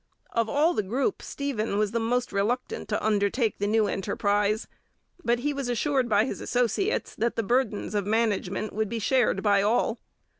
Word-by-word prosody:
Of 230 -1 0
all 305 +7 +3
the - - +1
group 255 - -1
Stephen 230 -8 -3
was 210 0 0
most 235 +2 0
reluctant 220 +6 -1
to 210 - -1
undertake 215 +2 +1
the 205 - 0
new 220 0 +3
enterprise, 205 +2 0 0.6
but 240 0 +1
he 290 +2 0
was 275 -3 -3
assured 255 +1 +1
by 210 +1 +4
his - - -5
associates 250 - 0
that 235 +1 -1
the 230 - 0
burdens 230 -2 0
of 205 -2 -1
management 215 -2 0
would 215 0 -1
be 235 - -3
shared 225 -3 +2
by 205 -2 +4
all. 225 +2 +1
225 Hz, 175 wpm, -27 LUFS, 205-245 Hz, 0.6 s, by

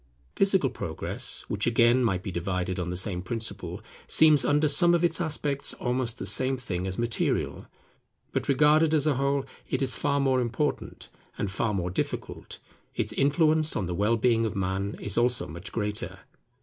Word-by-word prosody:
Physical 190 -9 +2
progress, - - -4
which 100 +1 -1
again 120 +2 +4
might 95 -6 0
be 95 - -4
divided 90 +1 -2
on 85 -1 -3
the 90 - -3
same 90 -1 -2
principle, 95 -2 -4 0.3
seems 155 -2 +5
under 150 +1 +2
some 170 +4 +4
of 170 - 0
its 170 +1 +1
aspects 145 -3 -2
almost 125 -1 -2
the - - -5
same 130 0 +2
thing 95 -7 -4
as 95 - -4
material. 120 -1 -1 0.6
But - - -3
regarded 150 +3 +4
as 150 -2 +1
a 155 - +3
whole 140 0 0 0.2
it - - 0
is 135 - +3
far 140 -1 0
more 130 -2 +2
important 125 +5 -3 0.3
and 100 - -2
far 110 +3 -1
more 90 -1 -2
difficult: - - -4 0.4
its - - -1
influence 155 +2 +2
on 100 - -1
the 90 - -3
well 105 +6 +1
being 115 0 +2
of 110 -1 -2
Man 95 +1 -2
is 105 +2 0
also 125 0 +2
much 85 +5 -8
greater. 105 -2 -4
120 Hz, 175 wpm, -27 LUFS, 100-145 Hz, 0.6 s, seems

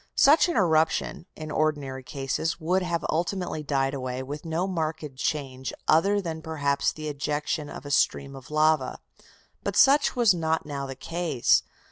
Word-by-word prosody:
Such 310 +5 +6
an 340 - -1
eruption, 165 -1 +1
in 155 -1 -7
ordinary 145 -4 -1
cases, 135 +5 -3
would 180 +4 +1
have 170 -3 -2
ultimately 175 0 -1
died 135 -2 0
away, 130 -1 -4
with 145 +4 -7
no 165 +3 -1
marked 160 -6 -3
change 130 -2 -3 0.2
other 200 +6 +4
than 165 -4 -4
perhaps 145 -3 0
the 155 0 -7
ejection 150 +1 -2
of - - -9
a 145 - -6
stream 140 0 +1
of 130 -1 -11
lava. 155 -2 +2 0.6
But - - -3
such 285 +1 +5
was 235 -5 +5
not 160 -2 -1
now 140 -2 -4
the 135 - -6
case. 165 -2 +1
155 Hz, 160 wpm, -26 LUFS, 140-170 Hz, 0.6 s, Such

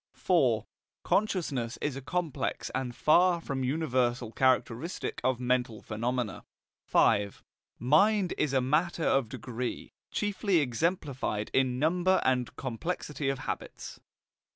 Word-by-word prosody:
IV. - - +2 0.4
Consciousness 155 - 0
is 145 -2 -2
a 135 - -5
complex 150 -2 -2
and 125 -2 -3
far 175 +6 +4
from 135 -5 -3
universal 125 -5 0
characteristic 130 +5 0
of 130 -1 +1
mental 125 -3 0
phenomena. 120 0 -2 0.4
V. 100 -2 +4 0.5
Mind 185 - +3
is 150 - 0
a 130 - +3
matter 160 +6 +1
of 135 -5 +2
degree, 125 0 -5 0.2
chiefly 205 -2 0
exemplified 135 - -1
in 130 -2 +2
number 180 +6 +2
and 125 -2 +1
complexity 145 +2 -3
of 135 - -1
habits. - - -6
130 Hz, 115 wpm, -29 LUFS, 125-165 Hz, 0.5 s, far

